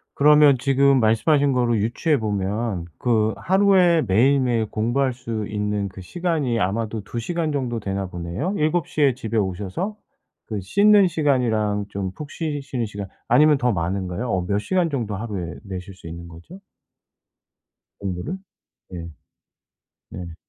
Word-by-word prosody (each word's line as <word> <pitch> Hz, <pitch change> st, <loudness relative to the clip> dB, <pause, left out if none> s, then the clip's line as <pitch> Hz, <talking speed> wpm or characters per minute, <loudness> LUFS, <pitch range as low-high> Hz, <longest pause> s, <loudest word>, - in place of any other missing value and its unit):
그러면 150 Hz, -2 st, +6 dB
지금 135 Hz, 0 st, +3 dB
말씀하신 140 Hz, +6 st, +3 dB
거를 120 Hz, -2 st, +2 dB
유추해 140 Hz, +7 st, +1 dB
보면 105 Hz, -2 st, -2 dB
그 110 Hz, -3 st, +1 dB
하루에 185 Hz, -3 st, +4 dB
매일매일 120 Hz, +2 st, +3 dB
공부할 120 Hz, +5 st, 0 dB
수 115 Hz, -4 st, -4 dB
있는 105 Hz, -1 st, -2 dB
그 95 Hz, 0 st, -11 dB
시간이 155 Hz, -, -1 dB
아마도 105 Hz, +3 st, -1 dB
2 115 Hz, -, -5 dB
시간 160 Hz, +5 st, -2 dB
정도 125 Hz, -5 st, -2 dB
되나 95 Hz, -1 st, -3 dB
보네요. 90 Hz, -, -4 dB
7 155 Hz, +2 st, +1 dB
시에 140 Hz, -4 st, +2 dB
집에 115 Hz, -2 st, -3 dB
오셔서 100 Hz, -, -2 dB, 0.5 s
그 105 Hz, -3 st, -3 dB
씻는 200 Hz, -, +5 dB
시간이랑 115 Hz, -, +1 dB
좀 95 Hz, -2 st, -4 dB
푹 145 Hz, +7 st, -8 dB
쉬시는 145 Hz, -6 st, -3 dB
시간 100 Hz, -2 st, -6 dB, 0.2 s
아니면 150 Hz, -1 st, +5 dB
더 125 Hz, -2 st, +1 dB
많은가요? 90 Hz, +5 st, -2 dB
어 90 Hz, -2 st, 0 dB
몇 100 Hz, +2 st, 0 dB
시간 180 Hz, -, 0 dB
정도 115 Hz, -8 st, -3 dB
하루에 95 Hz, -6 st, -5 dB
내실 95 Hz, -1 st, -7 dB
수 90 Hz, -, -12 dB
있는 85 Hz, +1 st, -8 dB
거죠? 85 Hz, -, -13 dB, 1.4 s
공부를? 100 Hz, -, -4 dB, 0.6 s
예. 85 Hz, -1 st, -6 dB, 1.0 s
네. 85 Hz, -2 st, -8 dB
115 Hz, 280 characters per minute, -22 LUFS, 100-145 Hz, 1.4 s, 그러면